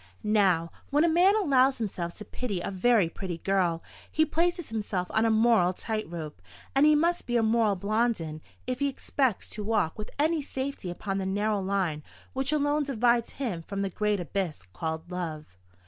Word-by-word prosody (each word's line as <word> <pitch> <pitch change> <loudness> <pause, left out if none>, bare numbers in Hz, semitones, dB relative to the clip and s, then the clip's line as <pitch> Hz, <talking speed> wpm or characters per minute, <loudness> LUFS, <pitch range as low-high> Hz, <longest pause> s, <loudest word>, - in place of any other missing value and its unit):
Now, 190 -6 +2 0.2
when 295 +2 +3
a - - +4
man 355 +5 +5
allows 275 -9 +3
himself 180 -6 -4
to 210 - -8
pity 215 -8 -3
a 175 - -4
very 205 0 +3
pretty 175 0 -5
girl, 175 -2 0 0.3
he 315 - +3
places 345 +1 0
himself 205 -5 -3
on 220 +1 +2
a - - +3
moral 220 -5 +4
tight 215 0 -3
rope; 155 - -7 0.3
and 275 +2 +5
he 305 - +6
must 340 +3 +1
be 240 0 +1
a 230 - +2
moral 220 -2 +3
Blondin 200 -6 -1 0.2
if 255 0 -3
he 280 - +2
expects 265 -4 -1
to 210 - -5
walk 210 -5 0
with 215 - -5
any 315 +2 +2
safety 265 -7 -4
upon 195 +2 -3
the 190 - -2
narrow 205 +1 0
line 185 -6 -1 0.3
which 265 +1 0
alone 295 0 +2
divides 240 -4 +1
him 230 -12 -3
from 200 +4 -4
the 195 - -2
great 210 +1 0
abyss 175 - -3
called 160 - -4
love. 165 -4 -4
215 Hz, 185 wpm, -28 LUFS, 180-265 Hz, 0.3 s, he